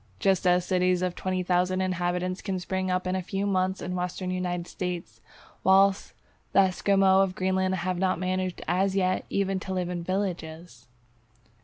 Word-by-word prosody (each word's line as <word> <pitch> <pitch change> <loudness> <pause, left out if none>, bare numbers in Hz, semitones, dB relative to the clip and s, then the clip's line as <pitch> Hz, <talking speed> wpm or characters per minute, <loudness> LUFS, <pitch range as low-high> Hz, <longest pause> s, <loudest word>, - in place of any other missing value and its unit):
Just 190 -1 +2
as 180 0 +3
cities 180 -1 +1
of 180 -1 0
20,000 185 0 0
inhabitants 180 0 -1
can 195 -2 -2
spring 185 +1 -2
up 185 0 0
in 185 0 -1
a 190 - -1
few 195 +2 -3
months 190 -1 0
in - - -4
the 180 - -2
Western 180 +1 -3
United 180 -1 -2
States, 180 -1 -5 0.4
whilst 195 +1 +4 0.4
the 195 - +7
Esquimaux 195 0 +3
of 190 -1 0
Greenland 190 0 0
have 185 0 -2
not 185 0 +1
managed 185 0 -2
as 190 +2 +1
yet 185 -1 +1
even 195 -1 0
to 190 0 -5
live 180 -1 -1
in 175 -1 -4
villages! 170 -7 -4
185 Hz, 170 wpm, -27 LUFS, 180-190 Hz, 0.4 s, the